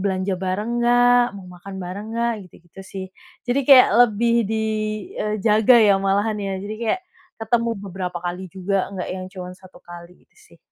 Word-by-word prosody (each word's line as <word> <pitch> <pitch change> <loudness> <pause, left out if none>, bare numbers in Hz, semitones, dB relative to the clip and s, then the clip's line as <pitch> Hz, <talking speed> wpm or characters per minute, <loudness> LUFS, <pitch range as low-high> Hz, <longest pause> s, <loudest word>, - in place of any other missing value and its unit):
belanja 190 0 -1
bareng 190 +4 -2
nggak? 245 +1 +4 0.2
Mau 195 - -10
makan 190 +2 -10
bareng 200 +4 -6
nggak?" 235 0 +1 0.2
Gitu-gitu 175 +2 -16
sih. 190 -1 -5 0.4
Jadi 250 +3 +1
kayak 265 -2 +9
lebih 235 0 +3
di, 220 - -1 0.6
eee, 215 0 -1
jaga 220 +2 +5
ya 215 -3 +6
malahan 200 +2 0
ya. 195 -1 -3
Jadi 210 +1 -5
kayak, 235 +10 -1 0.4
ketemu 230 +1 +1
beberapa 180 -2 -5
kali 180 +2 -4
juga, 190 +2 -2
nggak 185 - -4
yang 185 0 -6
cuma 180 -2 -7
1 185 -1 -16
kali 175 +1 -13
gitu - - -42 0.2
sih. - - -21
200 Hz, 175 wpm, -21 LUFS, 185-230 Hz, 0.6 s, kayak